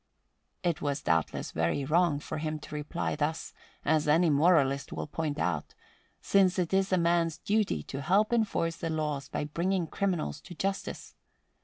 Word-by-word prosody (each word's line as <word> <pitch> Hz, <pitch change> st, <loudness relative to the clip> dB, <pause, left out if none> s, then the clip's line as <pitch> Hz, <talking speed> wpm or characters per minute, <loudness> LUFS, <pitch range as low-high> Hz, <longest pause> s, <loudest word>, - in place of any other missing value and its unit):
It 170 Hz, -4 st, 0 dB
was 145 Hz, 0 st, -2 dB
doubtless 80 Hz, -, 0 dB
very 85 Hz, +12 st, 0 dB
wrong 160 Hz, 0 st, +3 dB
for 150 Hz, -, -5 dB
him 155 Hz, 0 st, -2 dB
to -, -, -10 dB
reply 150 Hz, +3 st, -2 dB
thus, 155 Hz, +2 st, -2 dB, 0.3 s
as 155 Hz, -1 st, +2 dB
any 160 Hz, +2 st, +4 dB
moralist 140 Hz, -3 st, +3 dB
will -, -, -4 dB
point 150 Hz, -1 st, -3 dB
out, 85 Hz, -, -2 dB, 0.4 s
since 190 Hz, -2 st, +3 dB
it 180 Hz, 0 st, 0 dB
is 195 Hz, 0 st, +2 dB
a 185 Hz, -, +4 dB
man's 170 Hz, -1 st, +2 dB
duty 205 Hz, -, 0 dB
to 135 Hz, -, -6 dB
help 205 Hz, -, +2 dB
enforce 200 Hz, -8 st, +1 dB
the 165 Hz, -, -3 dB
laws 150 Hz, -3 st, -2 dB
by -, -, -2 dB
bringing 175 Hz, +4 st, 0 dB
criminals 175 Hz, -5 st, -2 dB
to 175 Hz, -, -11 dB
justice. 195 Hz, +3 st, -3 dB
160 Hz, 165 wpm, -29 LUFS, 145-180 Hz, 0.4 s, any